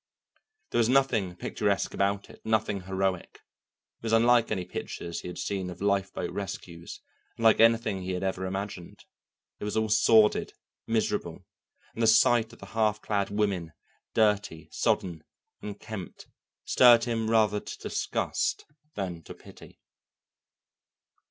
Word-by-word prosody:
There 120 Hz, -, +1 dB
was 115 Hz, 0 st, +3 dB
nothing 115 Hz, -9 st, +2 dB
picturesque -, -, -1 dB
about 100 Hz, 0 st, 0 dB
it -, -, -17 dB
all, -, -, -7 dB
nothing 110 Hz, -3 st, +1 dB
heroic. 95 Hz, -1 st, -2 dB, 0.6 s
It -, -, -47 dB
was 115 Hz, -1 st, -2 dB
unlike 115 Hz, +1 st, +4 dB
any 95 Hz, -4 st, -2 dB
pictures 85 Hz, -1 st, -6 dB
he -, -, -8 dB
had 90 Hz, -, -7 dB
seen 95 Hz, -2 st, -3 dB
of 90 Hz, -, -9 dB
lifeboat 95 Hz, -3 st, -1 dB
rescues, 85 Hz, -3 st, -7 dB, 0.4 s
unlike 115 Hz, -1 st, +4 dB
anything 115 Hz, -3 st, +3 dB
he 95 Hz, 0 st, -3 dB
had 90 Hz, +1 st, -3 dB
ever 95 Hz, 0 st, -2 dB
imagined. 95 Hz, -2 st, -6 dB, 0.5 s
It -, -, -8 dB
was 105 Hz, +1 st, -2 dB
all 110 Hz, 0 st, +1 dB
sordid, 110 Hz, 0 st, +4 dB, 0.3 s
miserable, 115 Hz, -1 st, -1 dB, 0.5 s
and 115 Hz, -, -5 dB
the 115 Hz, -, +4 dB
sight 115 Hz, +1 st, +4 dB
of 115 Hz, -, -14 dB
the -, -, -11 dB
half 110 Hz, -1 st, +1 dB
clad 100 Hz, -2 st, -1 dB
women, 100 Hz, -6 st, -1 dB, 0.4 s
dirty, 105 Hz, -7 st, +1 dB
sodden, 85 Hz, -4 st, -1 dB, 0.4 s
unkempt, 105 Hz, -1 st, -8 dB, 0.4 s
stirred 120 Hz, -2 st, +6 dB
him 115 Hz, -2 st, -1 dB
rather 110 Hz, -2 st, +3 dB
to -, -, -8 dB
disgust -, -, -2 dB, 0.3 s
than 90 Hz, -4 st, -4 dB
to -, -, -9 dB
pity. -, -, -15 dB
105 Hz, 140 wpm, -28 LUFS, 95-110 Hz, 0.6 s, stirred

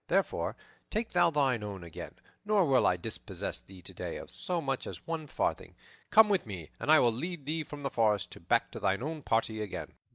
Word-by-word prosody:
Therefore, -, -, +1 dB, 0.3 s
take 225 Hz, +1 st, -1 dB
thou -, -, +4 dB
thine 135 Hz, -7 st, +2 dB
own 100 Hz, -3 st, -5 dB
again, 85 Hz, -2 st, -8 dB, 0.3 s
nor 205 Hz, -3 st, +3 dB
will 135 Hz, -4 st, +4 dB
I 90 Hz, -, +3 dB
dispossess 85 Hz, -, -4 dB
thee 95 Hz, -2 st, -14 dB
today -, -, -5 dB
of -, -, -9 dB
so 95 Hz, -, -2 dB
much 135 Hz, -4 st, -2 dB
as -, -, -7 dB
one 165 Hz, -2 st, -3 dB
farthing. -, -, -2 dB, 0.3 s
Come 220 Hz, 0 st, +8 dB
with 195 Hz, -, +1 dB
me, 90 Hz, -7 st, -7 dB
and 150 Hz, -, +1 dB
I 155 Hz, -, +9 dB
will 120 Hz, -, +5 dB
lead 165 Hz, +4 st, -4 dB
thee 160 Hz, +2 st, -1 dB
from 150 Hz, -1 st, -9 dB
the 135 Hz, -1 st, -2 dB
forest 105 Hz, -5 st, +2 dB
back -, -, +3 dB
to -, -, -6 dB
thine 95 Hz, +6 st, +1 dB
own 155 Hz, +1 st, -3 dB
party 115 Hz, -3 st, 0 dB
again." 105 Hz, -3 st, -5 dB
135 Hz, 205 wpm, -31 LUFS, 105-165 Hz, 0.3 s, I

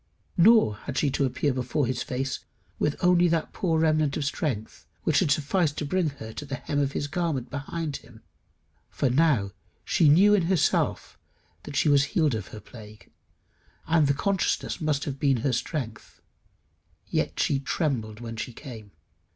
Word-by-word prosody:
Nor 190 Hz, -, +5 dB
had 135 Hz, +4 st, -6 dB
she 145 Hz, -, +2 dB
to 140 Hz, -, +1 dB
appear 130 Hz, +2 st, 0 dB
before 130 Hz, +3 st, -1 dB
his 125 Hz, 0 st, -2 dB
face 135 Hz, +1 st, -3 dB, 0.4 s
with 150 Hz, -, +1 dB
only 180 Hz, 0 st, +5 dB
that 165 Hz, -2 st, -1 dB
poor 165 Hz, -4 st, 0 dB
remnant 155 Hz, -2 st, +2 dB
of 145 Hz, -, -2 dB
strength 135 Hz, -7 st, -3 dB, 0.2 s
which 155 Hz, -, +3 dB
had 180 Hz, -, +1 dB
sufficed 155 Hz, +2 st, +1 dB
to 150 Hz, -, -2 dB
bring 175 Hz, +2 st, +1 dB
her 110 Hz, -6 st, -9 dB
to -, -, -6 dB
the 140 Hz, -1 st, -5 dB
hem 145 Hz, +3 st, -3 dB
of 140 Hz, -1 st, 0 dB
his -, -, -2 dB
garment 145 Hz, -5 st, -2 dB
behind 145 Hz, +1 st, -4 dB
him; 110 Hz, -2 st, -17 dB, 0.7 s
for 135 Hz, -4 st, 0 dB
now 130 Hz, -9 st, +2 dB, 0.3 s
she 155 Hz, -, +4 dB
knew 195 Hz, +8 st, +6 dB
in 185 Hz, -5 st, +3 dB
herself 185 Hz, -5 st, 0 dB, 0.5 s
that -, -, -7 dB
she 140 Hz, -, +2 dB
was 140 Hz, -1 st, +5 dB
healed 155 Hz, -2 st, +1 dB
of 105 Hz, -5 st, -4 dB
her 110 Hz, -, -9 dB
plague, 105 Hz, -2 st, -14 dB, 0.7 s
and 160 Hz, -2 st, +3 dB
the 140 Hz, -, +2 dB
consciousness 195 Hz, +2 st, -1 dB
must 150 Hz, -3 st, 0 dB
have 135 Hz, -1 st, -5 dB
been 135 Hz, -2 st, +1 dB
strength. 125 Hz, -3 st, -4 dB, 0.9 s
Yet -, -, -2 dB
she 140 Hz, -, +2 dB
trembled 125 Hz, -8 st, -2 dB
when 115 Hz, -1 st, -7 dB
she 120 Hz, +2 st, -5 dB
came. 115 Hz, -6 st, -10 dB
140 Hz, 170 wpm, -26 LUFS, 125-160 Hz, 0.9 s, knew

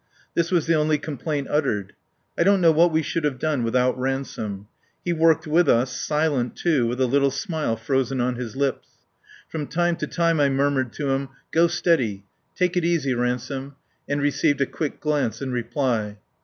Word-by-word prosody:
This 170 Hz, 0 st, +1 dB
was 175 Hz, -4 st, +2 dB
the 165 Hz, -, +2 dB
only 155 Hz, -1 st, +2 dB
complaint 150 Hz, -1 st, -3 dB
uttered. 110 Hz, -10 st, 0 dB, 0.4 s
I -, -, -1 dB
don't 195 Hz, +3 st, +4 dB
know 170 Hz, -2 st, +5 dB
what 165 Hz, +2 st, +4 dB
we 160 Hz, 0 st, +1 dB
should 165 Hz, +2 st, -2 dB
have 145 Hz, -3 st, 0 dB
done 150 Hz, -1 st, 0 dB
without 125 Hz, +2 st, +1 dB
Ransome. 120 Hz, -6 st, -3 dB, 0.4 s
He 175 Hz, -, +1 dB
worked 165 Hz, -1 st, +3 dB
with 160 Hz, +1 st, +3 dB
us, 125 Hz, +2 st, +2 dB
silent, 150 Hz, -4 st, 0 dB
too, 150 Hz, -9 st, +1 dB
with 120 Hz, +2 st, -3 dB
a 130 Hz, -, +3 dB
little 140 Hz, +2 st, +3 dB
smile 150 Hz, -, -2 dB
frozen 130 Hz, +3 st, -1 dB
on 125 Hz, +1 st, +1 dB
his 120 Hz, -3 st, -6 dB
lips. 135 Hz, -1 st, -1 dB, 0.6 s
From 150 Hz, -3 st, -4 dB
time 175 Hz, +2 st, +1 dB
to -, -, -3 dB
time 170 Hz, -2 st, +1 dB
I 140 Hz, -1 st, +4 dB
murmured 135 Hz, -2 st, +1 dB
to 140 Hz, -2 st, -2 dB
him: 135 Hz, 0 st, -1 dB, 0.2 s
"Go 165 Hz, +1 st, +4 dB
steady" 130 Hz, -, 0 dB, 0.3 s
"Take 180 Hz, 0 st, +1 dB
it 180 Hz, -, +1 dB
easy, 165 Hz, -6 st, +1 dB
Ransome" 125 Hz, +3 st, -3 dB, 0.3 s
and 145 Hz, 0 st, 0 dB
received 145 Hz, 0 st, +1 dB
a -, -, +4 dB
quick 150 Hz, +2 st, -4 dB
glance 150 Hz, -6 st, -1 dB
in 135 Hz, -2 st, -4 dB
reply. 120 Hz, -4 st, -1 dB
140 Hz, 185 wpm, -23 LUFS, 125-160 Hz, 0.6 s, know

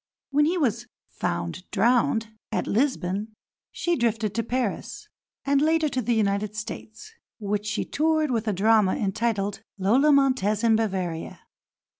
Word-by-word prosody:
When 295 Hz, +2 st, +4 dB
he 345 Hz, +4 st, +1 dB
was 240 Hz, -, 0 dB, 0.2 s
"found 85 Hz, -, -4 dB
drowned" 230 Hz, +2 st, +2 dB, 0.2 s
at -, -, -1 dB
Lisbon 215 Hz, -4 st, -1 dB, 0.4 s
she 345 Hz, 0 st, 0 dB
drifted 225 Hz, -, 0 dB
to 230 Hz, -, 0 dB
Paris, 240 Hz, -1 st, -3 dB, 0.4 s
and 280 Hz, 0 st, +3 dB
later 315 Hz, 0 st, +2 dB
to 255 Hz, -, -1 dB
the 240 Hz, 0 st, 0 dB
United 205 Hz, 0 st, 0 dB
States, 220 Hz, -, -8 dB, 0.2 s
which 210 Hz, -1 st, -2 dB
she 210 Hz, +1 st, -1 dB
toured 310 Hz, -1 st, +1 dB
with 230 Hz, -2 st, -1 dB
a 210 Hz, -, +1 dB
drama 210 Hz, 0 st, +3 dB
entitled 205 Hz, 0 st, -1 dB, 0.2 s
"Lola 240 Hz, +10 st, +4 dB
Montez 255 Hz, -7 st, +2 dB
in 225 Hz, -1 st, +5 dB
Bavaria." 185 Hz, -7 st, -2 dB
225 Hz, 140 wpm, -25 LUFS, 205-265 Hz, 0.4 s, in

